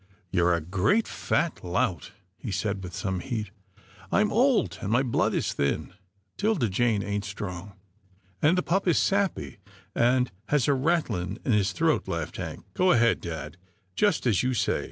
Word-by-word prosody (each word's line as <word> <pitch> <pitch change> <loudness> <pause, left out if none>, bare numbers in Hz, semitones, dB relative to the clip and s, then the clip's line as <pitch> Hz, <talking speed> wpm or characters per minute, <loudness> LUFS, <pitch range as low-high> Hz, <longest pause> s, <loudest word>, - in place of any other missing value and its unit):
" 95 -4 -39
You're 90 -2 +3
a 85 - -2
great, 95 - +1
fat 170 - -1
lout," 90 +1 -1 0.2
he 115 - -7
said 95 +1 -2
with 90 -1 -7
some 95 -3 -2
heat. 105 -1 -4 0.3
" 95 -1 -23
I'm 210 - +2
old, 225 - +2
and 100 - -3
my 125 +3 +3
blood 120 -4 +1
is - - 0
thin. 75 +4 -1 0.4
'Tilda 205 - +1
Jane 105 0 +1
ain't 100 0 -2
strong 100 -1 -6 0.2
— 105 - -39
" 95 +1 -34
" 95 0 -36
And 165 +5 +4
the 180 - +1
pup 195 +3 0
is 170 - +4
sappy, 195 - 0 0.3
and 125 +1 +2 0.2
has 145 -4 +2
a 145 - +4
rattling 130 - 0
in 130 - +1
his 100 -4 +2
throat," 90 - +1
laughed - - -3
Hank. - - -6
" - - -37
Go 185 0 +3
ahead, 115 0 +3
dad 80 -2 -6 0.2
— 95 -3 -42
just 205 -9 +2
as 110 -7 +3
you 130 0 0
say. 100 -4 +1
105 Hz, 195 wpm, -27 LUFS, 90-135 Hz, 0.4 s, And